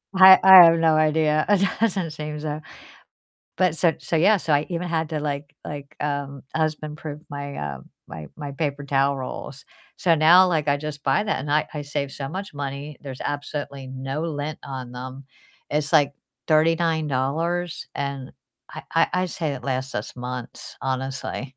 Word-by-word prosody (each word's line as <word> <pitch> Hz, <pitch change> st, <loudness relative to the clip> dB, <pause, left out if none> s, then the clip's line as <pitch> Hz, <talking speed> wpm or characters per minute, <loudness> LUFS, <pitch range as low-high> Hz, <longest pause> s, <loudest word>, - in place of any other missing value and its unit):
I 190 Hz, 0 st, +10 dB
I 190 Hz, -2 st, +11 dB
have 165 Hz, 0 st, +5 dB
no 160 Hz, -1 st, +4 dB
idea. 155 Hz, 0 st, +2 dB
It 195 Hz, -1 st, +4 dB
doesn't 190 Hz, -7 st, 0 dB
seem 150 Hz, 0 st, -6 dB
so. 150 Hz, 0 st, -4 dB, 1.0 s
But 185 Hz, -4 st, +2 dB
so 165 Hz, 0 st, +3 dB
so 165 Hz, -, -2 dB
yeah. 195 Hz, +7 st, +5 dB
So 165 Hz, -, -2 dB
I 145 Hz, +1 st, +2 dB
even 175 Hz, 0 st, -3 dB
had 160 Hz, -2 st, -1 dB
to, 155 Hz, -2 st, -2 dB
like 145 Hz, 0 st, -4 dB
like, 145 Hz, -1 st, -8 dB
um, 140 Hz, -2 st, -3 dB
husband-proof 155 Hz, -1 st, -3 dB
my, 140 Hz, 0 st, -6 dB
uh 70 Hz, -2 st, -5 dB, 0.3 s
my 80 Hz, -2 st, -8 dB
my 145 Hz, -2 st, -6 dB
paper 145 Hz, -1 st, -3 dB
towel 140 Hz, 0 st, +1 dB
rolls. 135 Hz, +1 st, -7 dB, 0.3 s
So 170 Hz, -3 st, +3 dB
now, 170 Hz, +4 st, +7 dB
like, 155 Hz, -4 st, 0 dB
I 140 Hz, -, +3 dB
just 145 Hz, 0 st, -6 dB
buy 135 Hz, +7 st, +2 dB
that, 200 Hz, -10 st, -1 dB
and 145 Hz, -, -5 dB
I 150 Hz, +1 st, +2 dB
I 150 Hz, -, -3 dB
save 140 Hz, -1 st, -3 dB
so 135 Hz, -1 st, -5 dB
much 190 Hz, +1 st, -6 dB
money, 140 Hz, +1 st, -5 dB
there's 135 Hz, -3 st, -8 dB
absolutely 145 Hz, -1 st, -4 dB
no 135 Hz, +3 st, -4 dB
lint 155 Hz, -1 st, -4 dB
on 130 Hz, -2 st, -6 dB
them. 130 Hz, +2 st, -8 dB, 0.5 s
It's, 150 Hz, +1 st, -1 dB
like, 145 Hz, -3 st, +4 dB, 0.4 s
$39, 160 Hz, +1 st, +1 dB
and 140 Hz, -2 st, -4 dB, 0.4 s
I -, -, -8 dB
I -, -, +5 dB
I'd 180 Hz, 0 st, 0 dB
say 160 Hz, -1 st, -3 dB
it 130 Hz, -3 st, -6 dB
lasts 130 Hz, 0 st, -2 dB
us 105 Hz, -, -5 dB
months, 125 Hz, 0 st, -7 dB
honestly. 130 Hz, 0 st, -3 dB
150 Hz, 175 wpm, -23 LUFS, 140-160 Hz, 1.0 s, I